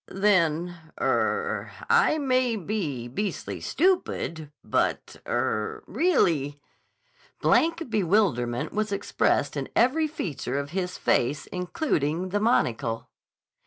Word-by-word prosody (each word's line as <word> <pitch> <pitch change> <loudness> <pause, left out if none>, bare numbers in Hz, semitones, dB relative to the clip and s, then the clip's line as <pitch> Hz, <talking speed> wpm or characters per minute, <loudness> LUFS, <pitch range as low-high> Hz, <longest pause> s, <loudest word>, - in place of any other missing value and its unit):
"Then—er—I 190 - +1
may 255 -4 +1
be 170 - -3
beastly 195 - -4
stupid, 170 - 0
but—er—really—" 160 - 0 0.8
Blank 330 0 +2
bewilderment 170 - +1
was 215 0 -1
expressed 200 - 0
in - - -3
every 300 +6 +3
feature 175 - -4
of 140 +1 -3
his 185 0 -3
face 145 +4 +1
including 180 - -1
the 205 +2 0
monocle. 125 - 0
185 Hz, 85 wpm, -26 LUFS, -, 0.8 s, every